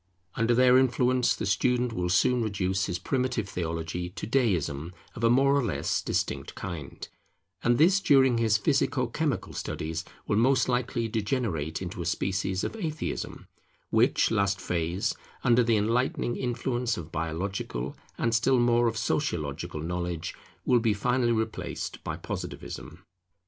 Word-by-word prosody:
Under 115 +1 +2
their 125 +1 +6
influence 125 0 +2
the - - -3
student 125 +4 +1
will 90 -3 -1
soon 125 +6 +3
reduce 95 -3 0
his 90 - -2
primitive 125 +1 -1
theology 85 0 -3
to 90 - -6
Deism 90 - 0 0.2
of 115 - -7
a 115 - +5
more 135 +3 +4
or 140 - +2
less 115 - -1
distinct - - -2
kind; 80 -6 -6 0.5
and 120 0 +3
this 185 +6 +5
during 135 -9 +4
his 110 -2 +3
physico 130 +2 +1
chemical 135 - -2
studies 80 +1 -4 0.2
will 105 - +1
most 130 +3 +3
likely 125 -2 0
degenerate 100 - -2
into 90 -1 -5
a 85 - -3
species 95 +2 -1
of - - -3
Atheism; 160 -6 -4 0.5
which - - +3
last 100 -1 +1
phase, 90 +5 -1 0.3
under 120 -1 +5
the 115 -1 +3
enlightening 120 +3 0
influence 120 -1 -1
of 80 -2 -7
biological 80 -6 -3 0.2
and 115 - 0
still 125 +3 +3
more 120 0 +4
of 115 -1 -1
sociological 75 - -2
knowledge, 85 0 -3 0.3
will 125 - +4
be 115 -2 +1
finally 120 +3 +1
replaced 110 -1 -3
by - - -4
Positivism. - - -7
115 Hz, 145 wpm, -28 LUFS, 90-125 Hz, 0.5 s, their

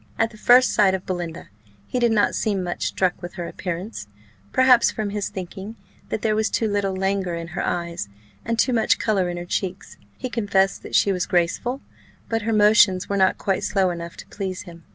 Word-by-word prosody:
At 225 0 +1
the 215 - -14
first 250 +3 +5
sight 195 -2 +4
of 190 - -6
Belinda, 175 -3 -5 0.4
he 250 - -2
did 240 -1 +3
not 210 -2 +3
seem 200 -4 -1
much 175 -1 -2
struck 185 -2 0
with 175 0 -7
her 175 -2 -4
appearance; 180 - -5 0.4
perhaps, 255 -2 +5
from 210 -2 -3
his 205 -1 -2
thinking 190 +3 -7 0.3
that 220 - -3
there 215 -1 +2
was 220 0 +1
too 225 - 0
little 200 -2 -1
languor 190 -2 -1
in 170 0 -6
her 170 - -3
eyes, 170 - -3 0.3
and 230 0 -2
too 255 - +2
much 225 -2 +3
colour 195 -5 0
in 175 - -4
her 175 - -5
cheeks; 190 +1 -4 0.2
he 255 - -4
confessed 205 -5 +1
that - - -6
she 200 - +4
was 180 -2 -1
graceful, 185 +10 0 0.5
but 225 0 0
her 225 +2 -1
motions 210 -3 +5
were 200 - 0
not 190 -1 +3
quite 195 -2 -1
slow 195 -3 +1
enough 170 0 -7
to - - -10
please 190 -2 -4
him. 170 -1 -13
195 Hz, 210 wpm, -23 LUFS, 180-220 Hz, 0.5 s, first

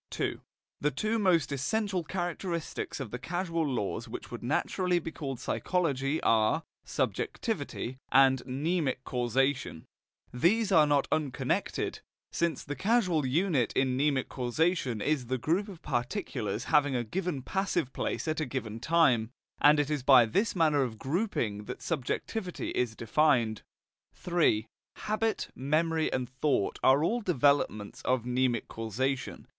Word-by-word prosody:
II. - - -1 0.4
The 150 - +2
two 215 - -1
most 175 -8 +3
essential 190 - -1
characteristics 175 -2 -3
of 130 -6 -5
the 125 - -4
causal 170 +4 -2
laws 125 -9 -2
which - - -8
would - - -6
naturally 180 -1 0
be 165 -1 -3
called 135 -6 -5
psychological 150 -5 0
are 110 -1 +3 0.2
SUBJECTIVITY 130 +2 -2
and 130 -1 +5
MNEMIC 140 0 -1
CAUSATION; 125 - 0 0.5
these 200 - +2
are 155 -5 +6
not 145 -1 +2
unconnected, 150 -5 -1 0.3
since 170 -1 -1
the 145 - -5
causal 185 - +2
unit 150 -3 +1
in 130 -1 +1
mnemic 140 -1 +1
causation 130 - 0
is 145 -5 0
the 130 +1 0
group 170 - 0
of 190 -5 -11
particulars 120 -2 -2
having 145 -3 +3
a 120 - 0
given 160 - -3
passive 175 -6 -1
place - - -3
at 155 0 0
a 155 - 0
given 115 -4 -4
time, 125 -6 +3 0.3
and 150 +1 +6
it 145 0 0
is 150 -2 0
by 130 -2 +7
this 200 - 0
manner 155 -4 +3
of 120 -4 -2
grouping 130 - -2
that 125 - -6
subjectivity 180 - -3
is 120 -3 -1
defined. 115 -3 +2 0.7
III. 160 -11 +3 0.3
Habit, 215 +1 -1
memory 155 +4 0
and 130 -1 -1
thought 130 -4 0
are 135 +3 +5
all 235 +8 +1
developments 140 - +1
of 125 -2 +1
mnemic 125 -1 0
causation. 125 +5 -3
140 Hz, 140 wpm, -30 LUFS, 125-170 Hz, 0.7 s, by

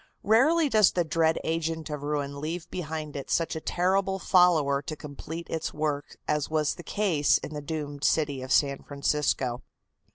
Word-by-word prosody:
Rarely 290 +10 +4
does 215 -7 +4
the 175 - +2
dread 160 0 +1
agent 160 -1 -2
of 150 -1 -4
ruin 145 -1 -3
leave 165 +2 -4
behind 155 -3 -5
it 140 - -6
such 165 -1 0
a 160 - -4
terrible 190 +3 +1
follower 170 -7 +3
to 155 +2 -6
complete 155 +3 -7
its 160 0 -4
work 150 -1 -2
as 150 -1 0
was 155 -2 +1
the - - -10
case 175 -7 +2
in 155 - -8
the 150 - -4
doomed 145 -1 -5
city 145 -4 +1
of 130 +1 -7
San 140 -1 +3
Francisco. 140 -3 -1
155 Hz, 170 wpm, -27 LUFS, 145-175 Hz, -, Rarely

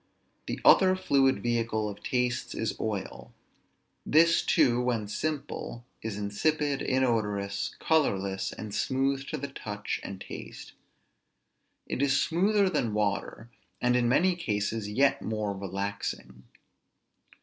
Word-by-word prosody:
The - - -3
other 185 -1 +7
fluid 135 - +2
vehicle 115 -2 0
of 105 -1 -7
tastes 125 -1 -1
is 110 - -2
oil. 95 - -4 0.7
This 165 +2 +5
too, 120 0 +3
when 120 -4 -1
simple, 140 -1 -4 0.2
is 110 -2 -4
insipid, 140 +8 0
inodorous, 105 -6 0
colorless, 100 -12 +1
and 105 -2 -7
smooth 135 +3 0
to 155 - -3
the 140 0 -5
touch 105 -6 -4
and 95 -1 -7
taste. - - -9 1.1
It - - -3
is 135 -1 +3
smoother 195 +6 +2
than 120 - 0
water, 105 +2 -2 0.3
and 125 0 +2
in 120 -1 +2
many 180 +8 +3
cases 105 - -2
yet 135 +6 +2
more 105 -2 -2
relaxing. 95 -10 -5
120 Hz, 120 wpm, -28 LUFS, 105-140 Hz, 1.1 s, other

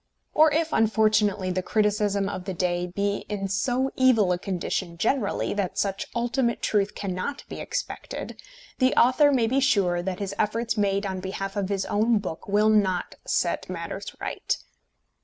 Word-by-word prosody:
Or 310 0 +6
if, 320 +1 0
unfortunately, 215 -3 +2
the 185 +1 -1
criticism 205 0 +1
of 185 -2 -5
the 190 -2 -4
day 175 0 0
be 200 +3 -1
in 200 -2 -2
so 245 +7 0
evil 230 -8 +4
a 175 - 0
condition 180 -2 -3
generally 220 +3 0
that 200 -3 -2
such 195 -1 -1
ultimate 240 0 0
truth 205 -1 +1
cannot 195 +8 -4
be - - -7
expected, - - -5 0.4
the 255 -1 +3
author 275 +4 +5
may 250 -4 +3
be 260 +4 +2
sure 200 -11 +2
that 185 0 -3
his 200 -1 -4
efforts 225 +2 0
made 200 -1 +1
on 190 -1 -3
behalf 195 +1 -4
of 200 -2 -1
his 195 -1 -1
own 220 +2 +2
book 180 -5 -5
will 210 +2 +3
not 195 -4 +2
set - - 0
matters - - -6
right. - - -2
205 Hz, 165 wpm, -26 LUFS, 190-235 Hz, 0.4 s, Or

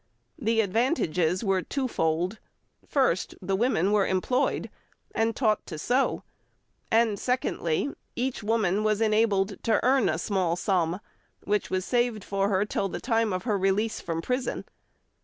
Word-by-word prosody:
The 225 -3 +2
advantages 185 - +1
were 195 -3 +2
twofold. 185 - -1 0.5
First, 255 - +1
the 195 +1 -1
women 200 -4 +2
were 210 -2 +3
employed 250 +8 0 0.4
and 225 0 +1
taught 215 -5 +1
to 160 - -6
sew, 250 - 0 0.7
and 225 -3 +2
secondly, 250 - -1 0.2
each 250 0 -2
woman 210 -2 +1
was 215 -1 +1
enabled 215 -3 +2
to 225 -2 +2
earn 260 -2 +4
a 155 - 0
small 185 -2 0
sum, 180 0 0 0.4
which 210 0 0
was 185 0 -1
saved 240 -4 0
for 195 0 0
her 200 0 +2
till 195 -1 -1
the - - -5
time 225 -3 +1
of 185 0 -2
her 210 -4 0
release 195 +4 +1
from 165 -1 -3
prison. 250 +1 -2
210 Hz, 145 wpm, -27 LUFS, 185-230 Hz, 0.7 s, earn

